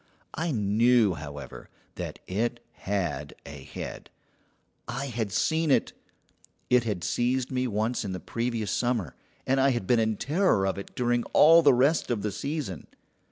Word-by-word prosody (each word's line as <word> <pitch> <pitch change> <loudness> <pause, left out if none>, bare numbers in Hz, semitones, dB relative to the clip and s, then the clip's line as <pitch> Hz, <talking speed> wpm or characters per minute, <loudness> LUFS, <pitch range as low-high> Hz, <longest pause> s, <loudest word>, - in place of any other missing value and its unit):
I 165 +2 -2
knew, 110 -1 +3
however, 75 -3 -9 0.2
that - - -6
it 120 +5 -2
had 85 -8 -3
a 70 -1 -9
head. 65 - -8 0.8
I 135 +4 -3
had 115 -6 -3
seen 160 +8 +1
it; 135 - +2 0.8
it 125 -1 +4
had 100 -6 -2
seized 125 +7 0
me 130 0 0
once 110 +3 -1
in 100 - -4
the 90 - -4
previous 115 +2 -3
summer, 120 - -1 0.3
and 135 +1 +2
I 135 - +4
had 120 -7 -1
been 120 +4 +3
in 110 -1 0
terror 150 - +2
of 95 0 -1
it 100 - -10
during 120 -1 +1
all 165 +2 +8
the 140 -5 +5
rest 140 +6 +2
of 115 -5 -1
the 105 - -1
season. 120 - -4
120 Hz, 160 wpm, -27 LUFS, 100-130 Hz, 0.8 s, all